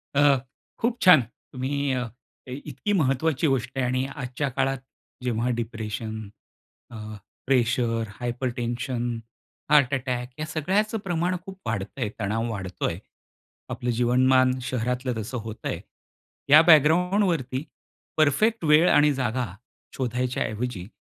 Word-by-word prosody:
अ, 145 -1 +5 0.4
खूप 235 0 0
छान. 180 -6 +8 0.3
तुम्ही 140 +2 -1
अ, 125 -1 0 0.4
काही 130 0 -6
इतकी 150 - -3
महत्त्वाची 155 -1 +1
गोष्ट 130 -1 -1
आहे 130 - +1
आणि 130 +1 0
आजच्या 135 0 -3
काळात 135 +1 0 0.5
जेव्हा 120 0 0
डिप्रेशन, 110 -1 -4 0.7
अ, - - -9 0.5
प्रेशर, 120 -3 +2 0.2
हायपरटेन्शन, 120 0 -2 0.5
हार्ट 145 -3 +5
अटॅक 125 -2 -2
या 155 - -2
सगळ्याच 190 +8 0
प्रमाण 175 0 0
खूप 190 -1 -9
वाढतंय, 110 +2 -2
तणाव 115 +3 -1
वाढतोय. 95 -4 -3 0.7
आपलं 125 - -3
जीवनमान 130 +2 +4
शहरातलं 125 +1 -1
तसं 125 +4 -5
होत 110 0 -8
आहे. - - -2 0.7
या 155 +2 +9
बॅकग्राउंडवरती 165 -3 +3 0.5
परफेक्ट 170 +8 +3
वेळ 155 +3 +6
आणि 150 0 +5
जागा 130 -1 -1 0.5
शोधायच्या 125 0 -1
ऐवजी, 110 -4 -4
130 Hz, 115 wpm, -25 LUFS, 120-150 Hz, 0.7 s, या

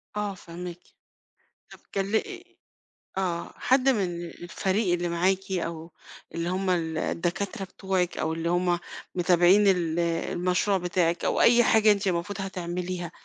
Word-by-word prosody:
آه 210 -1 -2
فاهماكِ، 175 -1 -8 0.9
طَب - - -12 0.2
كل 200 +2 0
أ - - +3 1.0
آه، 175 -3 -2
حد 260 +1 +3
من 185 -8 0
الفريق 185 +3 -1
اللي 175 0 -1
معاكِ 190 +3 0
أو 170 -2 -3 0.4
اللي 170 +1 -2
هم 190 +1 -1
ال 160 -3 0
الدكاترة 190 +5 -2
بتوعِك 190 -1 -2
أو 160 +1 -1
اللي 165 +1 -2
هم 175 0 +1 0.4
متابعين 180 +3 +5
ال 175 -3 +2
المشروع 180 +3 0
بتاعِك 175 -1 0
أو - - +1
أي 240 0 +6
حاجة 220 -1 +5
أنتِ 200 0 0
المفروض 190 +3 -1
هتعمليها، 180 -2 -4
180 Hz, 135 wpm, -27 LUFS, 170-195 Hz, 1.0 s, أي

